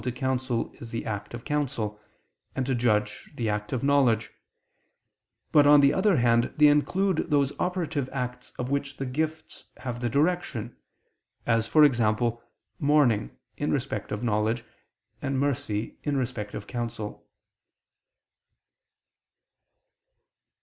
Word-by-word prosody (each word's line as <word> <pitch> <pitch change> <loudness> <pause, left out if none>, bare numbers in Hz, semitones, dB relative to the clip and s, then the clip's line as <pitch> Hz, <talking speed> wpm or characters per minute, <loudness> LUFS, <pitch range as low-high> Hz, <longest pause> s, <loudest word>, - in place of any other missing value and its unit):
to 125 - -2
counsel 130 -2 -2
is 115 - -9
the 115 0 -4
act 105 -1 -4
of 120 0 -8
counsel, 120 -8 -2 0.5
and 130 - -1
to 130 - 0
judge, 105 -4 0
the 115 - -2
act 105 0 -2
of 130 -2 -2
knowledge: 135 -6 +3 1.2
but, 145 -2 +6
on 145 0 +8
the 140 0 +5
other 190 -1 +3
hand, 120 -1 +3
they 150 - +6
include 170 +5 +2
those 140 -2 +2
operative 165 -7 -1
acts 125 -2 -4
of 125 +1 -3
which 140 -1 -2
the 135 - -3
gifts 155 +4 -4
have 120 -2 -5
the 120 -1 -1
direction, 140 -5 0 0.7
as, 115 -1 +1
e.g. 125 -8 +6 0.7
mourning 140 -8 +2 0.2
in 145 - -1
respect 130 -7 -2
of 105 +3 -3
knowledge, 110 +1 0 0.6
and 135 -1 -1
mercy 120 -6 -2
in 145 -2 -1
respect 120 -5 -3
of 105 - -6
counsel. 115 -3 -5
125 Hz, 130 wpm, -27 LUFS, 115-145 Hz, 1.2 s, on